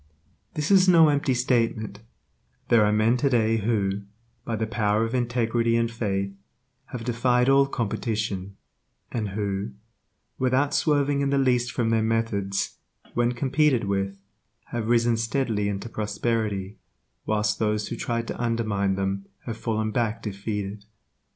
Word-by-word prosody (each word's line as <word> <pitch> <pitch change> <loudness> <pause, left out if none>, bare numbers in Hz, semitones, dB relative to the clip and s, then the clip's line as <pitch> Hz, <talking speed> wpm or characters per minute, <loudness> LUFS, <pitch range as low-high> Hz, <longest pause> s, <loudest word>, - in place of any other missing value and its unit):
This 150 +4 -1
is 190 -1 +6
no 165 -3 +7
empty 140 -2 +1
statement, 115 -4 0 0.7
There 115 -2 +6
are 105 - +3
men 110 +3 +3
today 115 -4 +2
who, 100 -2 0 0.4
by 115 - -2
the 110 0 -1
power 110 -1 +1
of 115 - -5
integrity 120 -2 +1
and 115 0 0
faith, 100 -4 -2 0.5
have 120 -2 -7
defied 125 +1 +2
all 135 0 +5
competition, 105 -5 -3 0.5
and 110 -3 -2
who, 100 +1 -3 0.7
without 130 +3 +2
swerving 145 -2 +2
in 140 - +1
the 140 - +2
least 125 -3 +2
from 115 -2 0
their 115 -1 +3
methods, 110 -3 -1 0.3
when 120 0 +1
competed 135 +1 +2
with, 100 0 -1 0.5
have 120 -3 -2
risen 115 -1 +3
steadily 115 -3 0
into 100 +2 -4
prosperity, 105 -2 -2 0.5
whilst 105 -1 +1
those 105 -1 0
who - - -3
tried 115 0 -2
to - - -4
undermine 110 -5 0
them 95 0 -2 0.2
have 115 - -4
fallen 110 -1 -1
back 115 0 -1
defeated. 100 0 -4
115 Hz, 140 wpm, -25 LUFS, 105-120 Hz, 0.7 s, no